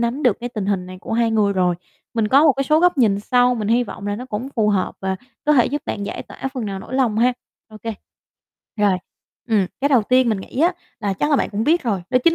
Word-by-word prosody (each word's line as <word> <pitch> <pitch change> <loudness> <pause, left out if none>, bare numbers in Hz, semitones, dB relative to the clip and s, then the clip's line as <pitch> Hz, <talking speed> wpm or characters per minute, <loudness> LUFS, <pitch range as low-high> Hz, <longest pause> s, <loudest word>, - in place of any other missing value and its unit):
nắm 240 +5 -1
được 245 -6 +3
cái 245 - -3
tình 215 -5 -4
hình 195 -3 -1
này 185 0 -9
của - - -6
hai 230 0 +2
người 210 -2 +2
rồi. 180 -2 +2 0.4
Mình 220 -2 +1
có 275 +5 +5
một 300 - +6
cái 275 +1 -2
số 305 +3 +3
góc 355 -4 +3
nhìn 205 -5 +3
sau, 250 +2 +3
mình 215 -2 -3
hy 240 +2 +3
vọng 205 - -8
là 205 - -1
nó 250 - -6
cũng 240 +3 -4
phù 215 -1 +3
hợp 195 -3 0
và 190 0 -2 0.3
có 300 - +4
thể 250 -5 +5
giúp 290 +2 -3
bạn 205 -1 -3
giải - - -5
tỏa - - -14
phần 250 - -3
nào 195 -1 -4
nỗi 245 - -8
lòng 240 -5 +1
ha. 250 +2 +4 0.4
Ô 215 - -12
kê. 225 -1 -3 0.8
Rồi, 205 -2 +3 0.5
ừm, 210 -4 +2
cái 280 - +2
đầu 260 -6 +4
tiên 255 +2 +3
mình 210 -4 0
nghĩ 260 - -5
á 345 +3 +4 0.3
là 205 -2 0
chắc 295 +10 -1
là 290 - +4
bạn - - -1
cũng 215 +2 -2
biết 330 +4 +3
rồi, 205 -7 -1
đó 255 - +4
chính 335 0 +5
230 Hz, 275 wpm, -21 LUFS, 205-260 Hz, 0.8 s, một